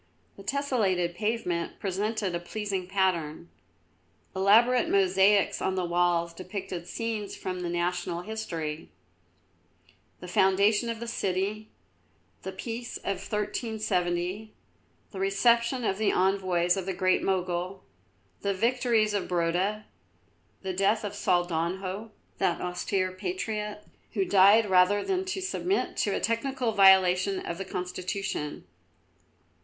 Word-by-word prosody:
The - - -12
tessellated 210 -11 0
pavement 195 -4 -2
presented 205 0 -2
a 170 - -1
pleasing 195 0 -4
pattern. 175 -4 -1 0.9
Elaborate 230 +6 +4
mosaics 195 +1 +3
on 190 - 0
the 185 -1 -1
walls 170 -1 +1
depicted 185 -1 -6
scenes 220 -1 -4
from 185 -1 -5
the 175 -1 -3
national 175 0 -2
history: 165 -8 -5 1.3
the 180 - -9
foundation 200 +5 +3
of 230 -1 -3
the 235 - -6
city; 205 0 -2 0.7
the 190 - -5
peace 230 +5 -6
of 195 -1 -3
1370; 210 -2 -2 0.6
the 195 - -7
reception 235 +6 +2
of 195 -2 -1
the 215 - +2
envoys 185 -2 +2
of 190 -1 -4
the 190 - -2
Great 185 -1 +2
Mogul: 185 0 -2 0.6
the 200 -1 0
victory 235 +1 +2
of 210 -2 -1
Brota; 180 +5 0 0.8
the 190 -1 -3
death 200 +4 +2
of 205 - -4
Saldanho, 185 +2 -1 0.3
that 180 -3 +1
austere 185 +1 -1
patriot, 210 +3 -4 0.3
who 195 -3 +1
died 200 +4 +6
rather 190 +2 +4
than 380 0 -1
submit 380 0 -1
to - - +1
a - - -1
technical 245 +1 -1
violation 190 -1 +5
of 170 +1 -4
the 195 - -4
Constitution. 180 -3 -4
195 Hz, 120 wpm, -28 LUFS, 180-215 Hz, 1.3 s, died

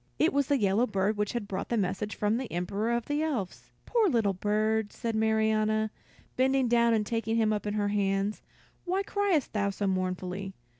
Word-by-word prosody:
It - - +3
was 280 -1 +2
the 285 - +3
yellow 210 +2 +2
bird 200 0 0
which 210 0 -1
had 235 -4 -3
brought 190 -2 -4
the 235 - 0
message 200 +1 -2
from 210 +2 +1
the 255 -1 -5
Emperor 195 +6 -1
of 235 -1 0
the 290 +1 -1
Elves. 255 - -3 0.2
"Poor 450 -5 +2
little 225 -8 +2
bird," 215 +2 0
said 230 -1 -3
Marianna, 220 0 +2 0.4
bending 265 0 +2
down 235 -1 +4
and 215 -1 0
taking 225 0 -1
him 220 -2 +2
up 210 0 -3
in 205 - -2
her 205 -1 0
hands, 200 0 0 0.4
"why 375 +2 0
criest 395 -8 0
thou 200 -2 +1
so 200 +1 -3
mournfully? 185 0 -2
215 Hz, 195 wpm, -29 LUFS, 200-235 Hz, 0.4 s, down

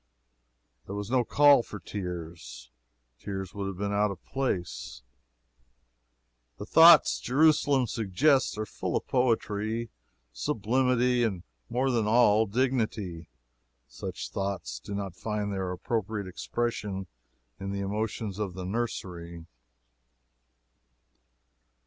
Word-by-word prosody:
There 100 - -5
was 105 +2 -5
no 130 -2 +3
call 145 +2 +6
for 105 - -9
tears. 85 -10 -7 0.5
Tears 95 -2 -5
would 100 -1 -4
have 95 -2 -5
been 100 +1 -2
out 105 +1 +2
of 95 -3 -8
place. 90 - -3 1.5
The - - -6
thoughts 165 0 +7
Jerusalem 140 -1 +3
suggests 115 +5 +2
are 110 - -2
full - - -3
of - - -5
poetry, 115 -2 0 0.4
sublimity, 125 - +1
and 95 -7 -1 0.3
more 130 +3 +1
than 115 -3 +1
all, 110 -1 +4
dignity. 110 -8 -1 0.6
Such - - -6
thoughts 95 -10 -3
do 100 +11 -7
not 100 -3 -4
find 105 0 -3
their 95 -2 -2
appropriate 105 +2 -2
expression 100 0 -3 0.5
in 100 0 -4
the 100 0 -3
emotions 105 0 -3
of 100 -4 -3
the 95 -1 -5
nursery. 90 -6 -4
105 Hz, 110 wpm, -28 LUFS, 95-120 Hz, 1.5 s, thoughts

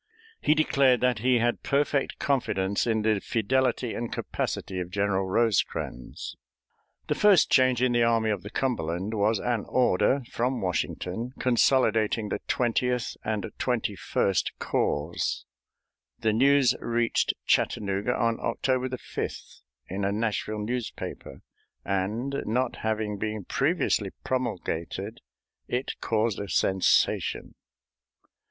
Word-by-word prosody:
He 150 - +3
declared 140 -5 +3
that 125 -3 +2
he 125 +2 +3
had 120 +1 +1
perfect 140 0 0
confidence 100 -7 0
in 110 -2 +1
the 110 -2 +2
fidelity 125 +3 0
and 120 -1 -4
capacity 95 -1 -3
of 90 -1 -4
General 100 0 0
Rosecrans. 95 - -1 0.7
The - - +2
first 205 -5 +5
change 130 -1 +4
in 130 - +3
the 120 0 +2
Army 115 -1 +3
of 100 -4 -2
the 100 - -8
Cumberland 100 -6 -2
was 110 +1 +2
an 120 0 -1
order 125 +2 +2
from 125 +2 0
Washington 90 +6 -2
consolidating 115 -4 +2
the - - -2
Twentieth 125 0 0
and 110 -3 -2
Twenty - - 0
first 95 -2 0
Corps. 75 +4 -1 0.7
The 110 -2 +1
news 135 +1 +4
reached 120 0 +1
Chattanooga 100 +3 +1
on 115 -1 +1
October 130 -1 0
5th 130 - -6 0.3
in 100 +2 -4
a 100 - +1
Nashville 105 0 -2
newspaper, 120 0 -5 0.4
and, 110 +8 -1
not 125 +3 0
having 110 -2 -2
been 105 -2 -3
previously - - +1
promulgated, 105 -4 -3 0.5
it 125 +2 -2
caused 110 -2 0
a 100 - -5
sensation. 95 0 +2
115 Hz, 120 wpm, -27 LUFS, 100-125 Hz, 0.7 s, first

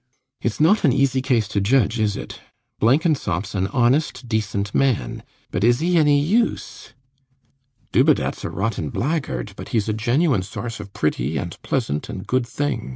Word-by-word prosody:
RIDGEON. - - -2
Its 115 - -3
not 170 +8 +4
an 145 - +5
easy 135 0 +2
case 125 -5 +1
to 105 -2 0
judge, 115 +1 +2
is 105 -2 +1
it? - - -8 0.4
Blenkinsop's 130 - +1
an 95 -1 0
honest 130 +2 +1
decent 105 -3 -2
man; 130 - 0 0.3
but 90 - -1
is 120 +1 +4
he 175 +3 +1
any 150 -3 +4
use? 215 +11 -1 1.0
Dubedat's - - +2
a - - -3
rotten 95 -6 -2
blackguard; 130 - -2
but - - -9
he's 110 -3 0
a 110 - 0
genuine 120 - +1
source 115 +4 -6
of 100 -1 -9
pretty 75 -1 -1
and 70 - -4
pleasant 75 +1 -2
and - - -6
good 130 -1 0
things. 140 - -2
120 Hz, 165 wpm, -22 LUFS, 100-140 Hz, 1.0 s, an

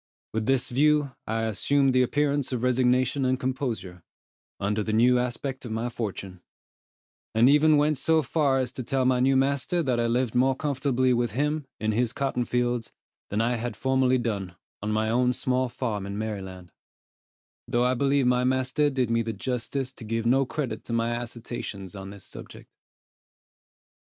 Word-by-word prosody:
With 110 0 -2
this 135 -2 +2
view, 150 +2 +3 0.2
I 115 +1 -1
assumed 135 +5 +2
the 130 - +4
appearance 145 +1 +1
of 125 -2 -2
resignation 125 +2 +2
and 130 0 +1
composure, 125 -9 -3 0.6
under 105 +2 0
the 110 +1 -2
new 125 +3 +4
aspect 130 +2 -3
of 120 - -7
my 115 +2 -2
fortune; 100 -5 -5 0.9
and 115 +2 +6
even 150 +2 +5
went 150 -1 +2
so 160 -1 +2
far 140 -1 +1
as 130 -1 -1
to 130 - -6
tell 130 +2 0
my 125 -1 +3
new 135 +1 +3
master 140 +6 +1
that 125 -4 0
I 115 - +1
lived 120 0 0
more 130 +2 +3
comfortably 130 -3 +1
with 120 -3 0
him, 150 +2 -1
in 110 0 0
his 120 +2 0
cotton 135 -3 -1
fields, 120 -1 -1 0.4
than 105 +2 0
I 120 +1 +1
had 115 -1 -4
formerly 130 +2 +2
done, 100 -7 -3 0.3
on 105 +1 -2
my 110 +1 +1
own 125 +2 +2
small 130 0 0
farm 105 -6 -3
in 100 +1 -5
Maryland; 95 -4 -6 1.0
though 120 0 +1
I 125 +1 +3
believe 140 +1 +2
my 125 0 +3
master 130 +3 +1
did 130 -4 -1
me 115 0 +2
the 115 0 -3
justice 125 +4 -3
to 120 - -11
give 115 +1 -2
no 130 +2 +3
credit 130 -8 -4
to 115 - -5
my 115 0 0
assertions 115 -5 -7
on 95 -1 -8
this 100 -1 -11
subject. - - -11
125 Hz, 175 wpm, -26 LUFS, 115-135 Hz, 1.0 s, and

